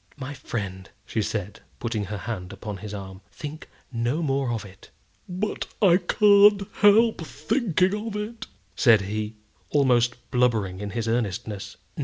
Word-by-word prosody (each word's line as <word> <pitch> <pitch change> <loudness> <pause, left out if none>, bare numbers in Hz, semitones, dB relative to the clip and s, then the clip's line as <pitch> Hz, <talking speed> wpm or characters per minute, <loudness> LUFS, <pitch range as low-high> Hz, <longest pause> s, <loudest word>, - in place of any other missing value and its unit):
"My 140 0 -6
friend," 95 -8 -5 0.2
she 110 - -1
said, 105 -1 -3 0.2
putting 110 -3 -2
her 105 +2 -5
hand 95 -3 -5
upon 100 +1 -6
his 105 +2 -8
arm, 95 -2 -8
"think 155 +2 -8 0.2
no 120 +7 -1
more 135 -3 0
of 115 -3 -3
it." 95 -1 -15 0.4
"But 185 +4 -3
I 180 -4 +6
can't 200 +2 +5
help 215 +1 +5
thinking 185 - 0
of 215 - -5
it," 210 +2 -5 0.3
said 115 -4 +5
he, 105 +2 -4 0.3
almost 125 -4 +3 0.2
blubbering 110 -7 +1
in 105 0 -4
his 115 +2 -3
earnestness. 110 -2 -2
120 Hz, 145 wpm, -25 LUFS, 105-175 Hz, 0.4 s, I